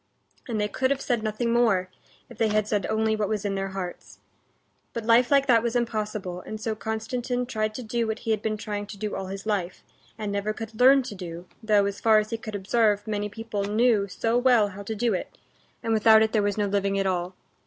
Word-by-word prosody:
And 225 -3 -2
they 210 - +1
could 260 +5 0
have 280 0 +1
said 245 -4 -1
nothing 220 +2 -1
more, 220 -6 +3 0.4
if - - -14
they 225 - +3
had 215 0 +1
said 210 -2 0
only 220 0 +1
what 210 -2 -1
was 210 -2 -2
in 200 - 0
their 195 0 -2
hearts. 190 -2 -7 0.8
But 230 -2 -4
life 235 +2 +5
like 275 -1 +4
that 235 -4 +5
was 235 +1 -2
impossible, 215 -6 -2
and 215 +3 -7
so 220 0 -2
Konstantin 240 +3 -3
tried 215 -3 -2
to 250 - -5
do 230 +1 -1
what 220 - -2
he 225 - -3
had 215 -2 +1
been 215 -1 -1
trying 205 -1 -4
to 205 - -9
do 210 +1 -4
all 190 -1 -4
his 195 +1 -7
life, 195 -4 -2 0.3
and 210 -2 -3
never 200 +1 -1
could 220 0 -8
learn 265 +2 +7
to 230 - -7
do, 175 -2 -8 0.2
though, 210 -2 +3
as 200 0 -4
far 220 -1 +5
as 215 +1 0
he 230 - -1
could 215 -2 -6
observe, 205 +1 +1
many 210 -1 -2
people 215 -1 -4
knew 210 0 +2
so 225 +5 0
well 245 -5 +4
how 200 +1 -9
to 220 +2 -5
do 230 +1 +1
it, 185 - -5 0.5
and 225 - 0
without 220 0 +6
it 220 - 0
there 220 - +2
was 205 0 0
no 210 - +1
living 200 0 0
at 195 - 0
all. 180 -1 -1
215 Hz, 240 wpm, -26 LUFS, 200-230 Hz, 0.8 s, learn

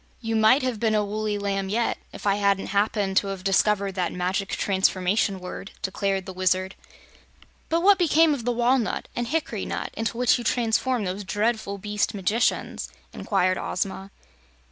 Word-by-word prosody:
"You 225 -2 -2
might 220 +5 +5
have 250 -4 -1
been 220 -1 +1
a 210 -1 +2
woolly 210 0 -2
lamb 195 -1 -2
yet, 230 +3 0
if - - -10
I 200 0 +3
hadn't 200 -1 +1
happened 200 -1 +1
to 200 - +3
have 195 -1 -5
discovered 200 0 +2
that 180 -2 -1
Magic 185 +2 -2
Transformation 190 0 +1
Word," 180 +2 -7
declared 195 0 -1
the 190 - -7
Wizard. 185 +1 0 1.0
"But 330 +1 +1
what 395 +1 +5
became 325 -2 +4
of 265 -5 -4
the 245 - 0
walnut 240 0 +1
and 240 0 -2
the - - -7
hickory 325 +3 -2
nut - - -4
into 225 +1 -3
which 250 0 +3
you - - -5
transformed 235 0 +1
those 190 +3 -3
dreadful 210 +1 -1
beast 210 +1 -2
magicians?" 205 +4 0 0.2
inquired 185 -2 0
Ozma. 190 +1 -3
205 Hz, 170 wpm, -25 LUFS, 195-230 Hz, 1.0 s, might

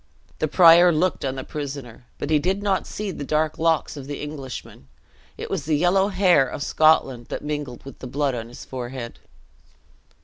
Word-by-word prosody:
The 155 - +1
prior 170 +2 +7
looked 170 +3 0
on 135 -1 -2
the 130 - -5
prisoner, 140 -6 -7
but 145 - -4
he 155 - +4
did 190 +6 -1
not 195 -2 0
see 210 -2 -4
the 150 - -6
dark 155 +2 0
locks 160 -1 +1
of 140 -2 -8
the 145 -1 -5
Englishman; 135 - -8 0.5
it - - -5
was - - -3
the 155 -1 +1
yellow 185 +4 +3
hair 185 -9 +3
of 140 - -5
Scotland 135 -6 +2
that - - -5
mingled 145 -5 -5
with 135 - -11
the 130 - -7
blood 140 +1 -1
on 115 -2 -5
his 120 - -11
forehead. 125 -1 -7
150 Hz, 190 wpm, -23 LUFS, 130-165 Hz, 0.5 s, prior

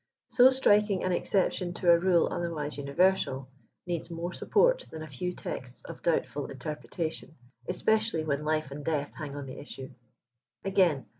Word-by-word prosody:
So 250 +1 +7
striking 210 -7 +3
an 185 - +1
exception 180 -1 0
to 175 -1 +4
a 170 - +6
rule 175 -1 +3
other 170 0 -2
wise 150 -2 -4
universal, 140 -2 +1 0.4
needs 175 -2 -3
more 170 +1 -4
support - - +3
than 160 0 -7
a - - -8
few 155 +6 -3
texts 125 -7 -7
of - - -9
doubtful 150 -3 0
interpretation, 155 +4 -5 0.3
especially 220 -1 +1
when 150 -1 -1
life 155 -2 0
and 145 +1 -7
death 145 -2 -1
hang 145 -2 -6
on 145 -1 -5
the 130 +1 -8
issue. 135 -2 -8 0.7
Again. 180 -8 +3
165 Hz, 160 wpm, -29 LUFS, 145-185 Hz, 0.7 s, So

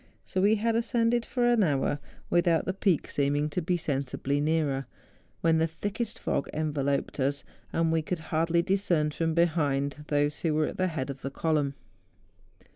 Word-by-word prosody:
So 185 - -1
we 205 +3 +5
had 225 +2 0
ascended 235 0 +1
for 245 -2 0
an 240 -3 +4
hour 145 -2 +1 0.3
without 170 -2 +3
the 185 - -1
peak 190 -4 +1
seeming 145 +1 +1
to 180 - -2
be 175 +2 0
sensibly 140 -1 -1
nearer, 150 -3 0 0.5
when 165 -1 +3
the 160 - +3
thickest 205 +7 -4
fog - - -2
enveloped 145 -3 -1
us; 140 +1 0 0.3
and 165 -1 +1
we 160 0 +2
could 175 +3 -3 0.2
hardly 165 +2 +2
discern 180 -5 +1
from 160 +1 -1
behind 150 -4 +1
those 145 0 +1
who 160 -3 0
were 155 0 +2
at - - -5
the 185 - +2
head 150 -5 -3
of 135 - -10
the 135 - -3
column. 145 -1 0
160 Hz, 175 wpm, -28 LUFS, 145-180 Hz, 0.5 s, we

